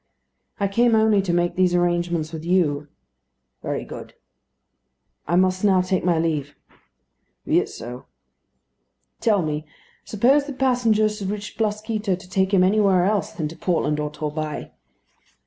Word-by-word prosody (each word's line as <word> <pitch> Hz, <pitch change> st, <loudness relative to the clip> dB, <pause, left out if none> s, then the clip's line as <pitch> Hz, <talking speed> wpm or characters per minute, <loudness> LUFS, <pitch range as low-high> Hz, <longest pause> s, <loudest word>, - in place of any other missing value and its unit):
"I 200 Hz, -, +1 dB
came 230 Hz, +3 st, +3 dB
only 220 Hz, -2 st, +4 dB
to 190 Hz, -2 st, -2 dB
make 175 Hz, 0 st, +1 dB
these 180 Hz, -1 st, +2 dB
arrangements 175 Hz, -2 st, 0 dB
with 160 Hz, -1 st, -6 dB
you." 160 Hz, -5 st, +1 dB, 0.7 s
"Very -, -, -3 dB
good." -, -, -10 dB, 1.1 s
"I 170 Hz, -, +1 dB
must 185 Hz, +1 st, +2 dB
now 190 Hz, -3 st, +4 dB
take 185 Hz, 0 st, -1 dB
my 175 Hz, -2 st, +2 dB
leave." 155 Hz, -3 st, -1 dB, 0.9 s
"Be -, -, +3 dB
it -, -, -3 dB
so." 125 Hz, +2 st, -9 dB, 1.1 s
"Tell 210 Hz, -5 st, +2 dB
me; 155 Hz, 0 st, -3 dB, 0.4 s
suppose 270 Hz, +7 st, +2 dB
the 285 Hz, -, -5 dB
passenger 245 Hz, -5 st, +2 dB
should 210 Hz, -2 st, -4 dB
wish 205 Hz, 0 st, -5 dB
Blasquito 215 Hz, -2 st, -1 dB
to 180 Hz, 0 st, -14 dB
take 190 Hz, 0 st, +1 dB
him 190 Hz, -3 st, +4 dB
anywhere 195 Hz, -2 st, +3 dB
else 205 Hz, -3 st, 0 dB
than 155 Hz, -, -3 dB
to 165 Hz, -, -10 dB
Portland 160 Hz, -3 st, 0 dB
or 150 Hz, 0 st, -2 dB
Torbay?" 150 Hz, 0 st, -5 dB
185 Hz, 145 wpm, -23 LUFS, 165-210 Hz, 1.1 s, only